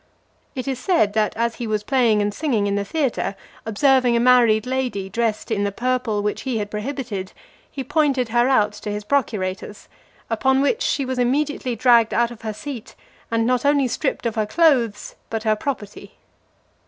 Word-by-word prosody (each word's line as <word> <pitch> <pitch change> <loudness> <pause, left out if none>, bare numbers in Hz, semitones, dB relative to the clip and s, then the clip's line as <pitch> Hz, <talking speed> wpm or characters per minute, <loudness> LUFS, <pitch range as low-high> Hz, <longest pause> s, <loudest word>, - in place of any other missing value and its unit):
It 255 0 -4
is 265 -2 -2
said, 255 - +2
that, 215 -1 0
as 235 0 0
he 240 - -4
was 215 -1 -1
playing 230 -5 +2
and 205 0 -1
singing 235 -6 0
in 200 - 0
the 200 0 0
theatre, 255 -4 -1 0.3
observing 255 +2 +3
a - - +3
married 235 -3 +4
lady 250 -7 -2
dressed 230 +1 -1
in 205 -2 0
the 200 - 0
purple 240 -2 -1
which 210 - -2
he 255 -4 -2
had 205 -1 -4
prohibited, 215 -4 -4 0.4
he 270 - -5
pointed 270 -3 +1
her 240 +2 +2
out 210 -5 +3
to 210 0 -7
his 210 0 -4
procurators; 205 -5 -2 0.4
upon 265 +4 +1
which 285 - +1
she 275 - 0
was 255 0 -3
immediately 260 0 0
dragged 235 -1 +4
out 235 0 +2
of 235 - -11
her 220 -1 -3
seat, 240 +2 -8 0.3
and 230 0 +1
not 250 +1 +1
only 285 -2 +3
stripped 250 +2 -2
of 230 - 0
her 215 -1 -1
clothes, 245 -8 +2 0.2
but 225 -1 -3
her 215 -1 +2
property. 210 -3 -6
235 Hz, 185 wpm, -22 LUFS, 210-260 Hz, 0.4 s, married